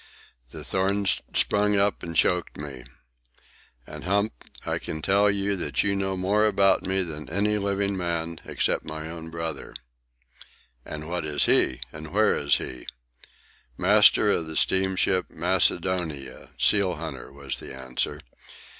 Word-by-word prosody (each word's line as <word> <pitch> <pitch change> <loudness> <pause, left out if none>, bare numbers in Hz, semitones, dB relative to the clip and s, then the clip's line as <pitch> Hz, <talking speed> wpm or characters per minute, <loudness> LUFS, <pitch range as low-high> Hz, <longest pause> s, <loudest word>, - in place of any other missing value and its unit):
The - - -9
thorns 100 +1 +1
sprung 105 0 +3
up 100 +1 +1
and 85 -1 -6
choked 90 0 +1
me. 70 -4 -8 1.0
And, - - -9
Hump, 100 +3 +1 0.3
I - - -1
can 80 - -5
tell 100 +1 +3
you 100 0 0
that 90 - -1
you 100 0 0
know 95 -1 -2
more 105 +4 +2
about 100 -1 +3
me 95 0 0
than 75 -3 -7
any 105 +4 +1
living 100 0 -1
man, 85 -2 -3
except - - -1
my 80 +1 -6
own 80 -1 -8
brother." 80 0 -5 1.1
"And 75 +2 -7
what 90 0 -3
is 75 -1 +1
he? 65 - +3
And 80 0 -9
where 105 +2 +3
is 70 0 +2
he?" 65 - -7 0.9
"Master 105 +2 +5
of 85 -4 -1
the 80 - -6
steamship 95 0 +2
Macedonia, 85 -5 0
seal 100 -4 +3
hunter," - - -7
was 70 -1 -4
the - - -9
answer. 65 -1 -3
90 Hz, 145 wpm, -25 LUFS, 80-100 Hz, 1.1 s, Master